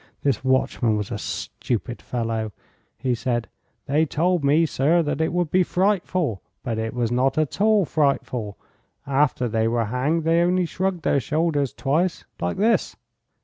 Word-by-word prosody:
This 140 -2 +1
watchman 130 -4 +1
was 105 -2 -4
a - - -3
stupid 120 +1 -4
fellow. 115 -3 -2 0.5
He 125 - 0
said: 120 -1 -1 0.4
'They 155 +3 +2
told 175 +2 +1
me, 150 +4 +4
sir, 160 +3 +2
that 150 0 -2
it 160 - +1
would 175 -3 -1
be 185 - +4
frightful, 180 - 0 0.2
but 115 -4 -2
it 110 +2 -3
was 120 -2 0
not 130 +3 +1
at 155 +4 -1
all 215 -3 +4
frightful. 130 -8 -1 0.5
After 135 -2 +1
they 110 0 +1
were 115 0 +1
hanged 135 +9 0
they 165 +1 +3
only 180 +1 +2
shrugged 185 0 -2
their 140 - +2
shoulders 145 +1 0
twice, 165 +6 -1
like 85 0 -2
this. 225 +3 +2
140 Hz, 160 wpm, -23 LUFS, 120-170 Hz, 0.5 s, me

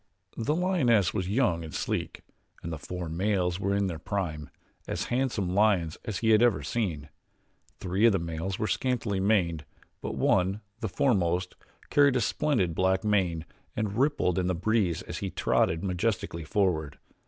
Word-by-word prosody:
The 145 +7 0
lioness 140 - +2
was 95 -3 -2
young 100 -7 +1
and 80 - -8
sleek, - - -3 0.4
and 85 - -4
the 80 - -5
four 90 +3 -5
males 90 +1 0
were 100 0 0
in 100 0 +1
their 85 -4 -3
prime 80 -7 -3 0.4
as - - -2
handsome 120 -8 0
lions 95 -6 +2
as 110 -5 -3
he 110 - +5
ever 110 -1 +5
had - - -8
seen. 85 -11 -2 0.7
Three 95 +5 +2
of - - +5
the 100 - +2
males 85 +2 -3
were - - -1
scantily 115 -4 -1
maned 90 -6 +1 0.4
but - - -4
one, 95 +3 +2 0.2
the 110 - -3
foremost, 90 -6 +1 0.4
carried 140 -2 +5
a 125 - +2
splendid, 110 - +1
black 95 +2 +1
mane 90 -6 +1 0.3
that 110 -1 -1
rippled 120 - +1
in 90 - 0
the 90 - 0
breeze 95 -2 0
as - - -6
he 100 - -3
trotted 80 -2 +1
majestically 90 -3 -2
forward. 80 -5 0
95 Hz, 165 wpm, -28 LUFS, 85-110 Hz, 0.7 s, he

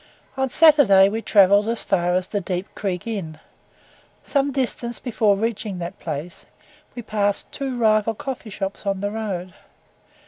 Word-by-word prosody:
On 265 0 -1
Saturday 250 -11 +6
we 220 +2 -3
travelled 200 0 +4
as 230 0 -2
far 180 -2 +1
as 185 0 -1
the 205 - -2
"Deep 180 +1 -3
Creek 185 -4 -3
Inn." 185 -9 -5 0.8
Some 280 -1 0
distance 245 -3 -3
before 215 -5 +1
reaching 215 -2 -3
that 175 +2 -6
place, 160 +2 -6 0.5
we 240 - -6
passed 205 -2 -1
two 270 -3 -4
rival 220 -1 +2
coffee 255 -1 -6
shops 195 0 -5
on 195 -1 -1
the 205 0 -2
road. 190 -5 -4
205 Hz, 150 wpm, -22 LUFS, 190-235 Hz, 0.8 s, Saturday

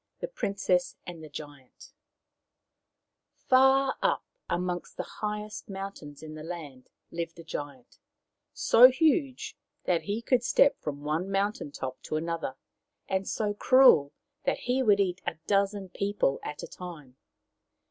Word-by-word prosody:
THE - - -3
PRINCESS 195 - 0
AND 170 -2 -8
THE 155 - -9
GIANT 145 - -11 1.4
Far 265 +1 +4
up - - +1 0.2
amongst 175 0 -2
the - - -2 0.2
highest 210 0 -4
mountains 190 -7 -7
in 155 -1 -8
the 155 - -8
land 155 -6 -8 0.2
lived 165 0 -4
a 170 - -10
giant, 145 -5 -7 0.5
so 245 +3 +7
huge 285 -1 +1 0.3
that 175 -2 +2
he 210 +3 -2
could 250 0 +3
step 275 +3 +4
from 145 -1 -5
one 155 +6 -1
mountain 195 -5 -1
top 130 -2 -6
to - - -4
another, 165 -4 -2 0.5
and 190 0 -1
so 210 -2 -1
cruel 225 - +6 0.3
that 275 - 0
he 250 +2 +1
would 205 -5 +4
eat 185 -2 0
a - - -1
dozen 200 -1 +1
people 200 -7 0
at 150 - -6
a - - -5
time. 155 -8 -10
185 Hz, 140 wpm, -28 LUFS, 155-215 Hz, 1.4 s, so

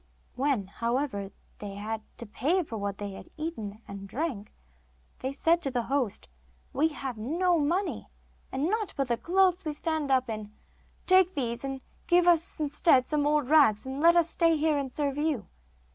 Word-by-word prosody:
When, 260 -6 0
however, 230 0 -2 0.3
they 200 -1 -7
had 215 +2 -4 0.2
to 235 - -7
pay 310 - 0
for 240 - -7
what 200 -1 -3
they 205 -1 -5
had 195 - -11
eaten 225 -10 -5
and 195 0 -8
drank, 250 -6 -3 0.7
they 260 - -3
said 330 +5 +2
to 280 - -2
the 245 -2 -1
host: 250 - -2 0.5
'We 300 +4 +3
have 270 -6 -6
no 340 +9 +1
money, 345 +7 -1 0.4
and 270 +3 -1
naught 425 +3 -1
but 275 -2 -1
the 235 - +1
clothes 370 +3 +2
we 305 -3 -3
stand 315 -1 -2
up 260 -1 +3
in. 215 -2 -6 0.5
Take 370 -1 +5
these, 240 -3 -2
and 270 -1 -4 0.3
give 350 0 +4
us 335 -1 +4
instead 295 -3 +3
some 295 0 0
old 295 -3 +2
rags, 275 -8 +5
and 265 +2 -4
let 340 +1 +6
us 340 -2 +4
stay 330 -2 +3
here 305 -1 +2
and 270 -2 -4
serve 285 0 -2
you. 295 -8 0
280 Hz, 180 wpm, -28 LUFS, 230-325 Hz, 0.7 s, let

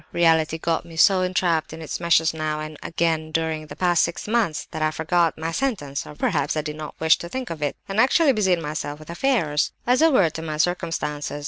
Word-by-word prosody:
'Reality' 160 -2 +3
got 165 0 -1
me 165 - -13
so 185 +3 +5
entrapped 180 -4 0
in 160 - -8
its 160 -3 -5
meshes 165 -1 +3
now 155 -1 -2
and 155 0 -6
again 160 -1 -1
during 160 -1 -2
the - - -9
past 175 -2 +2
six 170 +4 -3
months, 215 -8 0
that 155 - -5
I 155 - +2
forgot 160 +1 +1
my 160 +1 -3
'sentence' 165 - -2
(or 150 - -10
perhaps 150 -1 0
I - - +1
did 150 0 -5
not 155 0 -8
wish 160 0 +4
to 170 - -7
think 255 -1 -5
of 160 -2 -6
it), 145 -1 -1
and 195 +2 -2
actually 275 +4 +4
busied 190 -5 +2
myself 150 -2 -4
with 155 +2 -10
affairs. 170 - +1
"A 255 +7 +4
word 260 -10 +4
as 160 - 0
to 160 - -5
my 155 -2 -4
circumstances. 155 -4 -2
165 Hz, 225 wpm, -23 LUFS, 155-180 Hz, -, so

